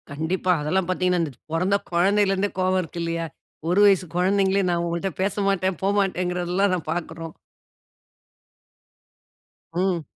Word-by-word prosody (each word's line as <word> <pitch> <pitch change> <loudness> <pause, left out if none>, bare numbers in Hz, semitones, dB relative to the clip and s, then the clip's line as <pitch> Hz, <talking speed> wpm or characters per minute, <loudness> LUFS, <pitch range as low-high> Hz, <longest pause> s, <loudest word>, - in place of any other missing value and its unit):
கண்டிப்பா. 160 +6 -1
அதெல்லாம் 175 +5 0
பாத்தீங்கன்னா, 180 -1 +1
இந்த 155 - -3 0.2
பொறந்த 180 +4 +2 0.2
கொழந்தையிலருந்தே 195 +2 +2
கோவம் 185 0 +2
இருக்கு 170 0 -6
இல்லையா? 165 0 -2 0.4
1 180 +3 +3
வயசு 195 -2 +4
கொழந்தைங்களே 195 +2 +2
நான் 170 -1 0
உங்கள்ட 170 +3 -2
பேசமாட்டேன், 195 -1 0
போமாட்டேங்கறதெல்லாம் 185 -1 +1
நாம 175 -4 -2
பாக்குறோம். 165 -1 -6 2.4
ம். 180 -2 0
185 Hz, 110 wpm, -24 LUFS, 170-195 Hz, 2.4 s, வயசு